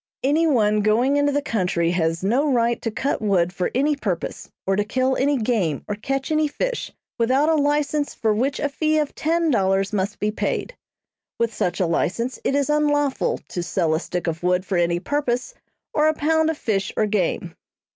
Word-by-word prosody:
"Any 305 +5 +3
one 215 -7 +3
going 240 +7 +2
into 285 0 +2
the 290 0 0
country 180 - 0
has 165 -1 0
no 265 +9 +2
right 235 -1 +1
to 225 - -1
cut 245 +5 -2
wood 185 -4 +1
for 180 -2 -1
any 290 +3 +2
purpose, 195 -11 -4 0.2
or 195 - +1
to 205 - +1
kill 260 +5 0
any 285 +1 +2
game 215 - 0
or 210 - -2
catch 270 +8 -3
any 310 0 +2
fish, - - -3 0.3
without 260 +6 +3
a - - +4
license 290 0 0
for 220 -2 +1
which 265 +7 0
a - - +1
fee 310 +2 0
of 300 -2 0
ten 330 0 +1
dollars 195 -3 +1
must 205 +1 -1
be 210 +1 -1
paid. 235 - -2 0.6
With 230 -1 0
such 175 -3 -1
a 185 - +2
license 230 +9 -1
it 275 - +1
is 285 -1 +1
unlawful 290 -2 +1
to 175 - -3
sell 170 -2 0
a 160 - +1
stick 175 -1 -4
of 165 -1 -2
wood 180 +1 +1
for 190 - -2
any 170 0 +1
purpose, 265 - -1 0.4
or 300 0 +3
a 310 - +2
pound 320 +1 +2
of 320 - -2
fish 200 -7 -1
or 215 - +3
game." 180 -4 -1
235 Hz, 200 wpm, -22 LUFS, 190-290 Hz, 0.6 s, a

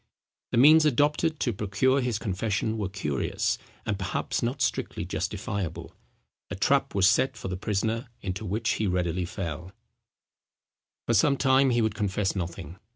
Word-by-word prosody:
The - - 0
means 155 +5 +7
adopted 150 +2 +2
to 120 - +1
procure 105 +7 +1
his 120 -4 -1
confession 105 +1 -1
were 100 -3 -2
curious, 85 -8 -1 0.3
and 100 -2 -2
perhaps 95 - -2
not 120 +4 -2
strictly 125 - -1
justifiable. 95 -5 -4 0.6
A - - -4
trap - - +1
was 95 -2 +5
set 130 +6 +2
for - - -5
the 90 - -2
prisoner 110 +6 -2
into 95 +2 -4
which 110 +3 -2
he 110 - 0
readily 90 -1 0
fell. 85 0 -6 1.3
For - - +1
some 140 -2 +4
time 135 0 +4
he 120 -2 +2
would 110 -2 0
confess 105 -1 -1
nothing. 85 -1 -5
105 Hz, 155 wpm, -27 LUFS, 95-125 Hz, 1.3 s, means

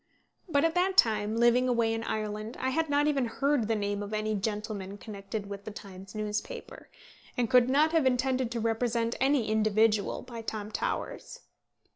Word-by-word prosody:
But 285 -1 +3
at 330 - +2
that 370 +2 +1
time, 215 -1 +4
living 240 +2 +4
away 230 -2 +2
in 225 0 -3
Ireland, 215 +1 -3
I 260 - 0
had 320 +2 0
not 290 0 +3
even 280 -5 +1
heard 275 -1 +1
the 225 - +1
name 205 -1 -2
of 205 +1 -4
any 215 0 -1
gentleman 205 -1 -3
connected 200 0 -6
with 200 0 -7
the 215 - -6
Times 195 -1 -10
newspaper, 210 0 -5 0.5
and 240 -2 0
could 250 0 +6
not 300 +4 +4
have 320 -5 +3
intended 255 -1 +1
to 235 - -2
represent 230 +1 0
any 270 -3 +3
individual 215 0 +2
by 235 -2 -8
Tom 215 -1 -5
Towers. - - -4
225 Hz, 175 wpm, -29 LUFS, 210-255 Hz, 0.5 s, could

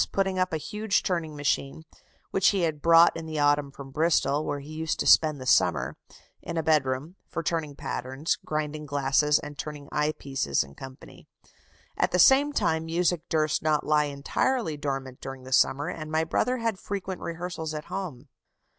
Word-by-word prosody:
putting 195 -1 0
up 185 0 +1
a 160 - 0
huge 210 +5 -1
turning 170 -5 -2
machine 145 +1 -1 0.5
(which 195 - +3
he 195 -2 +3
had 160 -3 -1
brought 165 0 +6
in 165 -1 -6
the 155 -1 -4
autumn 145 -1 +2
from 135 0 -11
Bristol, 155 -1 +2
where 145 -1 -3
he 145 +3 -10
used 160 0 -2
to - - -1
spend 155 -3 +5
the 130 - -7
summer) 85 - +2 0.5
in 170 - -5
a 165 - 0
bed 155 -3 +3
room, 140 +8 -4
for 165 - -4
turning 160 -3 -2
patterns, 130 +4 -2
grinding 150 0 -3
glasses, 140 +1 +2
and 145 -1 -8
turning 150 -2 -6
eye 150 +1 +1
pieces, 135 - -1
&c. 130 - -12 0.7
At - - +1
the - - +2
same 280 +2 +6
time 160 - 0
music 170 0 0
durst 155 -2 +1
not 155 -1 +1
lie 150 -1 +3
entirely 155 - -1
dormant 135 -3 -4
during 135 -1 -7
the 130 0 -6
summer, 140 +3 +3
and 155 -1 -5
my 160 0 +2
brother 250 +10 0
had 230 -5 -2
frequent 195 -2 -5
rehearsals 165 -2 -5
at 150 - -5
home." 155 -9 -6
155 Hz, 180 wpm, -27 LUFS, 140-170 Hz, 0.7 s, brought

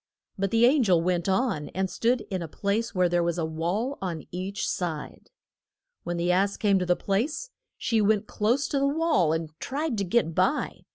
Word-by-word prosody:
But 195 0 -1
the 230 +3 +4
an 275 +3 +5
gel 185 -7 +4
went 175 +1 0
on 190 - 0
and 190 0 0
stood 235 +5 +1
in 185 -2 -2
a 165 - -4
place 205 +7 -2
where 180 -1 +3
there 175 0 +1
was 170 0 0
a 165 - 0
wall 175 - -2
on 170 -6 -3
each 190 +3 -3
side. 160 -5 -4 0.7
When 175 0 -3
the 175 +1 +1
ass 195 +2 +1
came 200 -3 +3
to 180 - -2
the 180 - +4
place 270 - -2 0.3
she 225 -2 +1
went 210 0 +2
close 240 +8 0
to 280 - 0
the 275 - +2
wall 290 - +2
and 160 -1 -2
tried 280 -4 -2
to - - +1
get 180 -3 +1
by. 185 - 0
195 Hz, 205 wpm, -26 LUFS, 175-235 Hz, 0.7 s, an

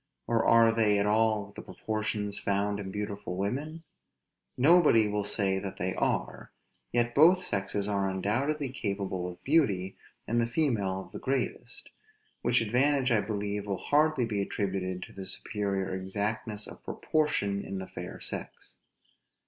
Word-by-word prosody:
or 115 -1 +1
are 115 0 +6
they 110 -2 +3
at 100 - +2
all 105 -1 +2
the - - -7
proportions 105 -2 -3
found 100 +1 0
in 95 -2 -5
beautiful 100 -1 -4
women? 145 - -3 0.7
Nobody 145 -6 +6
will 105 0 -1
say 100 -1 +1
that 95 0 -6
they 95 +1 -1
are; - - -2 0.4
yet 120 0 +1
both 175 +6 +6
sexes 100 - -1
are 100 -2 0
undoubtedly 130 +10 -1
capable 100 -6 -3
of 90 -1 -9
beauty, 105 - +2 0.3
and 120 +1 +2
the 115 - +1
female 115 -8 0
of - - -13
the - - -7
greatest; 130 -1 -3 0.5
which 120 0 +3
advantage 130 +4 +2
I 110 -3 +4
believe 105 -1 -3
will 100 -2 -1
hardly 150 -3 +2
be 105 -3 -1
attributed 95 -2 -2
to - - -11
the 95 - -7
superior 100 -3 -2
exactness 105 +3 -3
of - - -11
proportion 105 -11 0
in 95 - -5
the 95 - -4
fair - - -8
sex. - - -4
105 Hz, 150 wpm, -29 LUFS, 100-120 Hz, 0.7 s, are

